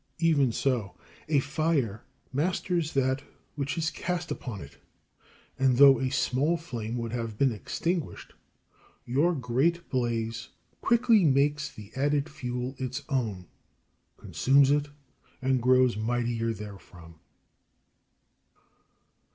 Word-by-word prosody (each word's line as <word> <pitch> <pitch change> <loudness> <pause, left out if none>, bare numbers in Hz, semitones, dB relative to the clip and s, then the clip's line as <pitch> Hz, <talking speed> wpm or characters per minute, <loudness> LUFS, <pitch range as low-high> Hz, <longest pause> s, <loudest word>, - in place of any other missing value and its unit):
Even 150 -7 +3
so 115 -8 -1 0.3
a 150 - +3
fire 145 -7 -1 0.3
masters 170 +2 -1
that 130 0 +1 0.3
which 140 +2 -3
is 160 -1 0
cast 175 -1 -3
upon 115 -7 -5
it, 70 - -12 0.8
and 130 -2 +3
though 135 -2 +8
a 130 - 0
small 140 +4 +1
flame 120 -8 -5
would 115 -1 -4
have 115 -3 -4
been 135 0 +3
extinguished, 165 - -3 0.7
your 150 +8 +2
great 135 +7 0
blaze 115 -2 -2 0.3
quickly 230 -3 +4
makes 145 0 +2
the 105 -1 -12
added 145 +2 +1
fuel 125 -3 -4
its 130 -1 -4
own, 110 - -2 0.7
consumes 140 +1 +3
it, 145 0 +2 0.5
and 130 -1 +1
grows 130 0 +4
mightier 115 +1 -1
therefrom. 95 -6 -10
130 Hz, 110 wpm, -28 LUFS, 115-150 Hz, 0.8 s, though